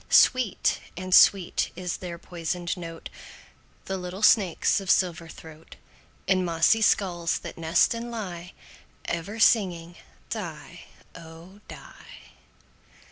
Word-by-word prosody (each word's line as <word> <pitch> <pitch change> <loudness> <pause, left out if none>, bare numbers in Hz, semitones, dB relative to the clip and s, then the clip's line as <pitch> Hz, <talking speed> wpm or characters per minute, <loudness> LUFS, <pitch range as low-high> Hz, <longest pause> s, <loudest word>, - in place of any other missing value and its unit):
Sweet 255 -7 +3 0.2
and 185 0 -4
sweet 185 -1 +4
is 180 -1 -4
their 175 -2 -7
poisoned 175 0 -4
note, 165 -2 -8 0.8
The 190 0 -4
little 180 +3 -7
snakes' 200 -5 +3
of 195 - -8
silver 175 -3 +1
throat, 160 0 -13 0.5
In 185 -1 +2
mossy 170 +6 +2
skulls 175 -6 +1
that - - -9
nest 165 +5 +2
and 230 +1 -6
lie, 180 -7 -7 0.5
Ever 175 +6 -4
singing 175 -7 +2 0.3
"die, 175 -4 -7 0.3
oh! 165 +4 -13
die." - - -14
180 Hz, 115 wpm, -25 LUFS, 165-195 Hz, 0.8 s, sweet